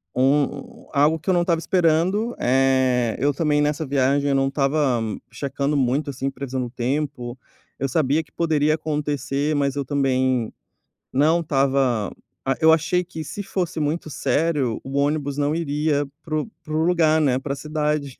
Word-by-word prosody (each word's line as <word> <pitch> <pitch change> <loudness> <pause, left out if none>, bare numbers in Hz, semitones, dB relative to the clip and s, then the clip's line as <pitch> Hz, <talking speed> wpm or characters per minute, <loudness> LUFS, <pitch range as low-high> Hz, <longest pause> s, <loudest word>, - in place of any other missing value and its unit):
um 135 +3 0
algo 150 +3 +3
que 170 - -5
eu - - +4
não 175 - +3
estava 170 -1 +1
esperando, 180 +6 +1
eh, 130 -2 +2
eu 145 +2 +2
também 150 0 +1
nessa 150 +2 0
viagem 140 +1 +2
eu 140 - +2
não 135 0 +2
estava 135 -2 +1 0.3
checando 140 +3 -2
muito, 135 +3 +1
assim, 135 +1 -3
previsão 135 -1 -4
do 125 - -3
tempo, 125 0 -3 0.4
eu 135 - 0
sabia 150 +2 +1
que - - -29
poderia 155 -2 +1
acontecer, 150 -1 -2
mas 140 -1 0
eu 140 -1 -2
também 130 -3 +1 0.6
não 155 +6 +3
estava 135 - +1 0.3
ah, 135 - +1
eu 160 0 +7
achei 165 +3 +1
que 165 -3 -7
se 205 +7 -6
fosse 180 -4 -3
muito 155 +2 -2
sério, 145 -5 0
o 135 +1 -4
ônibus 145 -1 0
não 145 +1 +1
iria 150 -2 0 0.2
para 155 - -3
o - - -7 0.2
para 155 - -7
o 155 - +2
lugar, 160 -3 +3
né, 130 -4 +2
pra 140 +1 -3
cidade. 150 -2 -2
145 Hz, 170 wpm, -23 LUFS, 135-155 Hz, 0.6 s, eu